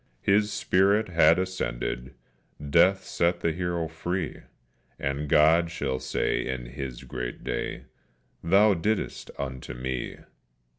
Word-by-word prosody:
His 105 +1 +3
spirit 100 +3 +2
had 85 -1 +5
ascended, 65 -8 -3 0.6
death 95 +4 +5
set 85 +1 0
the 85 - +1
hero 85 -1 -2
free, 85 +1 -3 0.6
And 70 +2 -3
God 80 +3 +5
shall 70 -6 -2
say - - -1
in 65 -2 -3
His 65 0 -7
great 60 -1 -6
day, - - -3 0.6
"_Thou 100 +1 +4
didst 110 +2 -1
it - - -14
unto 65 -2 -5
Me! 65 0 -4
80 Hz, 120 wpm, -27 LUFS, 65-95 Hz, 0.6 s, had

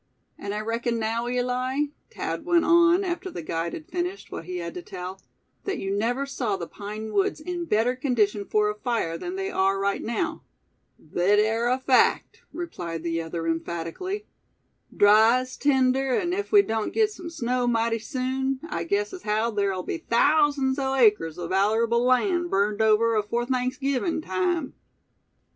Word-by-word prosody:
"And 200 0 -5
I 210 - -2
reckon, 230 +1 -1
now, 230 +2 -1
Eli?" 250 +3 0 0.3
Thad - - -4
went 345 -1 +3
on, 340 +2 +5
after 365 +1 -3
the 175 - -7
guide 165 +2 -3
had 310 - -7
finished 360 +2 -4
what - - -6
he 180 +1 -5
had 170 -1 -5
to 180 - -6
tell; 185 +1 -8 0.4
"that 390 -1 -2
you 195 +1 -2
never 245 +6 0
saw 240 -7 -2
the 175 - -5
pine 210 +4 -7
woods 200 +8 +1
in 345 +2 -4
better 235 -2 +1
condition 215 -6 0
for 210 +1 +2
a 210 - 0
fire 210 -6 -2
than 355 - -5
they 385 0 -3
are 195 +1 +2
right 200 0 0
now?" 315 +8 -2 0.7
"Thet 190 +4 +3
air 225 +3 +2
a 255 - +2
fact," 260 -1 +2
replied 170 - -5
the 165 -1 -1
other, 165 0 -5
emphatically. 170 - -3 0.7
"Dry 220 +4 +5
as 255 0 -8
tinder, 265 -2 +2
an' 350 0 0
ef 405 +2 -3
we 410 -2 +7
doan't 220 - -2
git 435 -1 +2
sum 360 -5 -8
snow 250 -5 -1
mighty 230 -1 +1
soon, 260 +3 -2
I - - -3
guess 405 +3 -1
as 370 - -7
haow 215 +2 0
ther'll 195 -3 0
be 330 - -4
thousands 285 0 +2
o' 270 0 0
acres 210 -10 +3
o' 175 - -4
vallerable 220 +5 +2
land 345 +8 +2
burned 205 -1 +1
over 220 +1 +4
afore 215 +3 0
Thanksgivin' 265 +5 -1
time." 350 -6 -1
240 Hz, 170 wpm, -25 LUFS, 205-295 Hz, 0.7 s, we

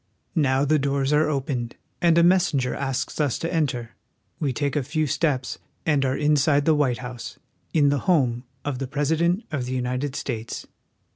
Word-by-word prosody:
Now 140 -4 +2
the 155 +1 +3
doors 140 0 0
are 150 +1 +3
opened, 130 -4 -2 0.3
and 170 -1 +4
a 170 - +6
messenger 170 -8 +3
asks 135 +2 -2
us 145 -5 +1
to 165 +2 -3
enter. 130 -8 -1 0.5
We 145 -4 0
take 140 +3 -1
a 145 - +2
few 155 +4 -1
steps 140 -2 -1 0.3
and 150 -4 +2
are 130 0 0
inside 145 -1 +3
^he 160 - +4
White 135 -5 +2
House, 125 -1 -7 0.3
in 145 -3 +4
the 145 0 +1
home 125 -8 +2 0.2
of 140 -3 -2
the 135 - -3
President 160 - +1
of 135 -5 -2
the 125 - -4
United 125 +2 -2
States. 115 -5 -4
140 Hz, 180 wpm, -24 LUFS, 130-155 Hz, 0.5 s, a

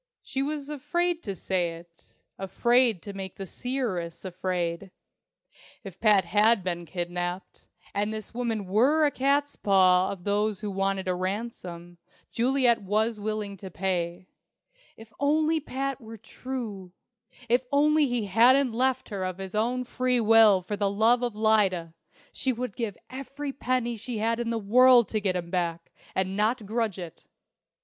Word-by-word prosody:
She 270 - -3
was 290 0 -3
afraid 345 +4 -1
to 200 - -5
say 180 -2 -1
it 170 0 -16 0.2
afraid 230 +2 +2
to 200 - -7
make 190 -1 -7
the 195 - -6
seeress 195 -8 -4
afraid! 180 0 -3 0.9
If 190 -3 -10
Pat 210 -5 +4
had 210 +1 +3
been 175 -2 -3
kidnapped, 175 +2 -5 0.3
and 205 +1 -1
this 215 0 -7
woman 230 -4 -2
were 260 +12 +3
a 290 - +2
catspaw 205 -10 +3
of 190 -3 -6
those 210 0 0
who 210 -2 -3
wanted 195 0 -1
a 185 - +1
ransom, 180 -3 -5 0.3
Juliet 245 -1 +2
was 215 +3 0
willing 210 -1 -3
to 190 0 -9
pay. 175 0 -2 0.7
If 225 0 -14
only 310 +2 +2
Pat 275 -1 -4
were 225 0 -10
true 220 -5 -7 0.5
if 245 +2 +3
only 300 +1 +4
he 240 -4 -1
hadn't 240 +5 +4
left 260 +2 0
her 200 -3 -4
of 185 -1 -3
his 190 -1 -7
own 240 +4 0
free 250 0 0
will 220 -4 +6
for 205 +3 -3
love 215 +4 +2
of 240 -3 -2
Lyda, 200 -6 +2 0.4
she 265 - 0
would 245 -3 -4
give 220 -6 -4
every 275 +2 -6
penny 250 -3 -1
she 235 +2 -5
had 225 +2 0
in 235 -1 -2
the 230 - -1
world 240 +2 +5
to 215 - -1
get 190 -2 0
him 170 -1 -4
back, 170 -2 -2 0.2
and 190 0 -1
not 215 +2 0
grudge 220 -2 -1
it! 175 -3 -9
215 Hz, 155 wpm, -27 LUFS, 190-250 Hz, 0.9 s, will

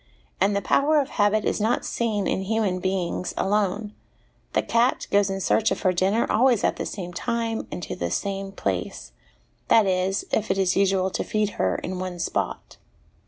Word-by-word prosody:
And 200 +2 +2
the 200 - -1
power 300 +2 +3
of 275 - -1
habit 205 0 +2
is - - 0
not 225 +4 +1
seen 215 -4 -1
in - - 0
human 195 -2 0
beings 185 -1 -2
alone. 205 +1 0 0.6
The - - +2
cat 235 +2 +1
goes 200 0 +3
in 195 0 -2
search 220 +3 +2
of - - -2
her 185 -2 +3
dinner 195 +6 +2
always 240 -1 +3
at - - +1
the - - -3
same 180 -4 -6
time 230 +4 -2
and 180 - -5
to - - -4
the 85 - -3
same 195 - -3
place 90 - -3 0.6
that 225 -2 +5
is, 190 +1 0
if 220 - 0
it - - +1
is 190 -2 +2
usual 190 -1 +2
to - - -2
feed 215 -1 0
her - - +2
in 185 0 -4
one 185 -1 -4
spot. 170 - -3
195 Hz, 190 wpm, -24 LUFS, 185-215 Hz, 0.6 s, that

